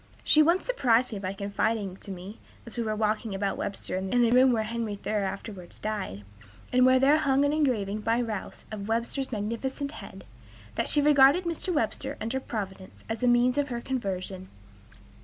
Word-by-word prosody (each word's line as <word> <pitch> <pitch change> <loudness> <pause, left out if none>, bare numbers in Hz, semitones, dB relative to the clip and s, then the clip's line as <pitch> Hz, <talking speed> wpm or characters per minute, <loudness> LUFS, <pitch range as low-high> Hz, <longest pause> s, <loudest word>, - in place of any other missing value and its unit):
She 310 - +6
once 340 +4 +3
surprised 255 - +2
me 210 - -4
by 190 0 -3
confiding 200 0 -1
to - - -12
me 190 +3 -8 0.3
(as 230 - -11
we 240 - -1
were 215 -2 -2
talking 215 -1 -1
about 195 0 -1
Webster 195 -2 -3
in 190 0 -3
the 230 - +3
room 255 +1 +6
where 225 -2 +1
Henry 225 -1 -3
Thoreau 210 +1 -2
afterwards 195 -1 -6
died, 205 - -4 0.5
and 255 0 +6
where 260 0 +6
there 275 +4 +5
hung 275 -2 +2
then 285 0 +3
an 305 - 0
engraving 215 -7 0
by 225 +2 +1
Rowse 225 -5 -4
of 205 -2 -5
Webster's 235 +4 -1
magnificent 240 +6 -3
head) 190 -9 -10 0.5
"that - - -1
she 290 - +3
regarded 290 +3 +6
Mr. 340 +2 -2
Webster, 275 -1 -1
under 230 +4 -2
Providence, 195 -6 -6
as 225 0 -2
the 250 - +1
means 245 +3 +4
of 285 - +1
her 240 -3 -3
conversion." 195 -7 -4
230 Hz, 190 wpm, -28 LUFS, 200-265 Hz, 0.5 s, She